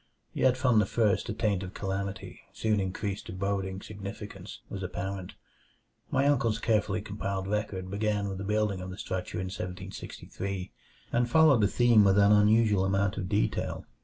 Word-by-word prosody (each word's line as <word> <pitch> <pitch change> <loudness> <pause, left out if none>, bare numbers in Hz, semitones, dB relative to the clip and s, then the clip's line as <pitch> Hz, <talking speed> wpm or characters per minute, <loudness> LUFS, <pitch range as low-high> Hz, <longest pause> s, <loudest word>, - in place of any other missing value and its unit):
Yet 130 -1 +3
from 125 -4 +4
the 105 - +2
first 110 0 +1
a - - -1
taint 105 -4 0
of 95 -1 -7
calamity, 95 -1 -4
soon 110 0 +1
increased 95 +1 -3
to - - -6
boding 95 0 -2
significance, 100 -1 -8
was 100 - -6
apparent. 95 0 -4 0.8
My 135 +1 +2
uncle's 120 -6 +2
carefully 110 -2 0
compiled 100 -2 -3
record 100 -3 -2
began 105 0 0
with 95 -1 -4
the - - -4
building 105 -2 0
of 90 - -6
the 95 - -7
structure 95 -2 -4
in 95 - -2
1763, 95 0 -6 0.4
and 120 0 +1
followed 150 -3 +6
the 100 - +5
theme 120 0 +5
with 100 0 +4
an 100 0 +6
unusual 105 -1 +4
amount 100 +1 +1
of 90 -2 -3
detail. 105 +2 -1
100 Hz, 165 wpm, -29 LUFS, 95-110 Hz, 0.8 s, followed